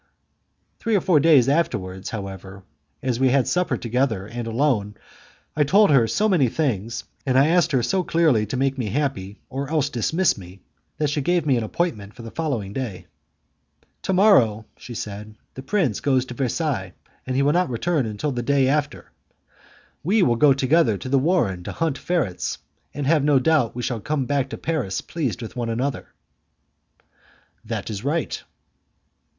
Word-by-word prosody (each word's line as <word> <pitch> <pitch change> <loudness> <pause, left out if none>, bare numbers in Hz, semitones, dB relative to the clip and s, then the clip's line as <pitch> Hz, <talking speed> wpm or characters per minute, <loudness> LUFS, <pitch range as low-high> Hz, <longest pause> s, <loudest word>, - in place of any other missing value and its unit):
Three 225 -2 0
or 195 - +3
four 165 -4 +4
days 145 -5 +5
afterwards, 105 - -1
however, 95 -2 -7 0.4
as 125 -2 -1
we 130 0 +4
had 130 0 +2
supper 180 0 0
together 120 -4 -1
and 120 +2 -6
alone, 115 -4 0 0.6
I 150 - +3
told 200 +6 +4
her 125 -5 +5
so 205 - +1
many 165 - +3
things, 115 -6 -2 0.2
and 130 -2 +1
I 140 +3 +5
asked 170 0 +3
her 130 -4 +2
so 185 +10 +1
clearly 155 -12 +2
to 130 - -3
make 135 0 0
me 120 - -1
happy 105 -6 -2
or 135 +1 -5
else 150 -3 0
to 120 - -4
dismiss 165 - +1
me, 90 +1 -12 0.4
that 150 -1 0
she 145 - -1
gave 175 +3 +1
me 140 -3 +3
an 120 - 0
appointment 110 - -3
for 120 - -10
the 115 - -9
next 120 -12 -2
day. 115 -8 -5 1.0
"To 190 - -1
morrow," 130 - +4
she 120 - -10
said, 105 0 -7 0.2
"the 130 - -8
prince 140 - 0
goes 130 -3 +1
to 125 - -8
Versailles, 125 - -2 0.3
and 130 - -2
he 135 - +2
will 145 +1 +3
not 180 -3 +2
return 135 +2 0
until 110 +8 -3
the 125 -2 -2
day 135 +2 +2
after; 145 +1 -1 0.9
we 195 +5 +3
will 120 -6 +3
go 145 +4 +5
together 135 -3 +3
to 130 - -7
the 135 0 +3
warren 120 - +1
to - - -4
hunt 160 -4 -1
ferrets, 160 - -1 0.3
and 145 0 -4
have 150 0 +3
no 145 -1 +4
doubt 135 -4 +2
we 120 - -4
shall 120 -2 -2
come 145 +2 -1
back 140 0 0
to - - -6
Paris 140 -13 -2
pleased 130 -7 -3
with 110 - -8
one 120 -2 -2
another." 125 +3 -2 1.6
"That - - -4
is 100 -1 -5
right." 150 +4 -2
135 Hz, 180 wpm, -23 LUFS, 115-155 Hz, 1.6 s, days